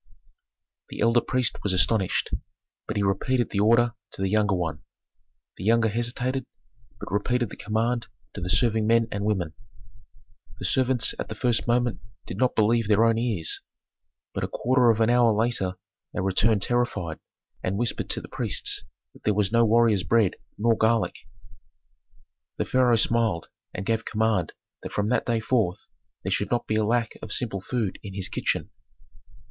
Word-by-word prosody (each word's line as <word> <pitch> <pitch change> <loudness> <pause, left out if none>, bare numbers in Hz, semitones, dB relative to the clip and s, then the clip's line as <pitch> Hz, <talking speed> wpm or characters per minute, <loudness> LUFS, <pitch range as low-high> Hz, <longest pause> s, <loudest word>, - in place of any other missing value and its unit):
The - - -8
elder 115 +2 +4
priest 130 -1 0
was 100 - 0
astonished, 95 +2 +2 0.6
but - - -3
he 100 - +1
repeated 120 +6 0
the 100 - -1
order 115 +3 +4 0.2
to - - -6
the 95 - 0
younger 105 -2 +2
one. 80 -4 -3 0.8
The - - -7
younger 115 +2 +3
hesitated, 120 +4 -1 0.6
but - - -8
repeated 120 +2 0
the - - -7
command 115 +2 -1 0.3
to 100 - -7
the 90 - -3
serving 110 +3 +3
men 115 0 +3
and 100 0 -3
women. 95 -7 -1 1.0
The - - -6
servants 130 -2 +2
at - - -4
the 110 - -5
first 120 0 +1
moment 120 0 +1 0.3
did 90 - -6
not 125 +2 +1
believe 115 +1 +2
their 110 +2 +4
own 115 0 +2
ears, 110 -9 0 0.7
but - - -3
a - - 0
quarter 125 0 +2
of 115 0 +3
an 110 +1 +4
hour 120 -1 +5
later 105 -4 0 0.4
they - - -1
returned 100 +2 +2
terrified, 120 -10 -1 0.4
and 95 +2 -2
whispered 120 +1 -1
to - - -1
the - - -10
priests - - -1 0.3
that - - -19
there 105 - +1
was 105 -1 +1
no 115 0 +4
warriors' 115 -3 +4
bread 110 0 +2 0.2
nor 115 +2 +3
garlic. 110 +1 +2 1.4
The - - -1
pharaoh 125 -2 +3
smiled 110 -6 +1 0.2
and 95 - -6
gave 115 +1 0
command 110 -6 0 0.3
that - - -8
from 105 +1 0
that 125 - 0
day 115 -2 +1
forth 110 -7 0 0.4
there - - -2
should - - 0
not 120 - 0
be - - -2
a 110 - +2
lack 115 +1 0
of 110 - -8
simple 105 -6 -1
food 110 -2 -2
in 100 -2 -8
his 95 -2 -2
kitchen. - - -2
110 Hz, 175 wpm, -25 LUFS, 100-120 Hz, 1.4 s, hour